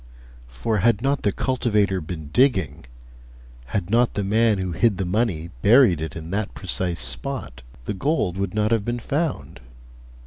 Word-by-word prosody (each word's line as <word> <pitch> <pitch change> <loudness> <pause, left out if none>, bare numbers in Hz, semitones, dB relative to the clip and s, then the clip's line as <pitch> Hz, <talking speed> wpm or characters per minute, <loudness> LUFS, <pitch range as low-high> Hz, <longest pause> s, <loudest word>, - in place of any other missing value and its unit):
For 60 - -2
had 115 +2 +2
not 140 +1 +1
the 100 - +1
cultivator 105 -7 0
been 80 -2 -7
digging, 95 - +2 0.8
had 90 +8 -3
not 120 +1 +2
the 100 - -1
man 110 +2 +2
who 95 -1 -3
hid 105 +3 +2
the 95 - -2
money 90 -4 -1
buried 110 - +5
it 80 - -5
in 80 +1 -7
that 100 +1 -3
precise 90 -2 -2
spot, 130 - -3 0.2
the - - -2
gold 105 - 0
would 95 -1 -3
not 105 +1 +1
have 115 -3 +2
been 120 +3 -2
found. 145 - -3
100 Hz, 165 wpm, -23 LUFS, 90-120 Hz, 0.8 s, buried